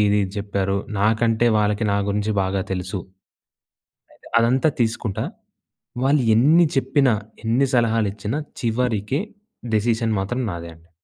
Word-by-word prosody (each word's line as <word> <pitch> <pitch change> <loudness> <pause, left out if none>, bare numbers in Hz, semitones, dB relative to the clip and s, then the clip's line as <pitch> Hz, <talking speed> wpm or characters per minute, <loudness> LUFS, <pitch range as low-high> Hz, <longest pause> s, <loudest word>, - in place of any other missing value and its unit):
ఇది 105 0 +3 0.2
చెప్పారు. 100 -1 -1 0.2
నాకంటే 115 +2 +2
వాళ్ళకి 105 +1 +1
నా - - +2
గురించి 105 +1 -1
బాగా 95 +1 -1
తెలుసు. 95 +1 -3 1.1
అయితె - - -18
అదంతా 130 +6 +3
తీసుకుంటా 110 -2 -1 0.8
వాళ్ళు 140 +1 +3
ఎన్ని 160 +8 +5
చెప్పినా, 135 -1 +3 0.3
ఎన్ని 125 +5 +2
సలహాలిచ్చిన 110 -1 0 0.3
చివరికి 115 +1 0 0.5
డెసిషన్ 110 +1 +1
మాత్రం 120 +7 -2
నాదే 85 0 -6
అండి. 80 +1 -23
110 Hz, 115 wpm, -22 LUFS, 100-125 Hz, 1.1 s, ఎన్ని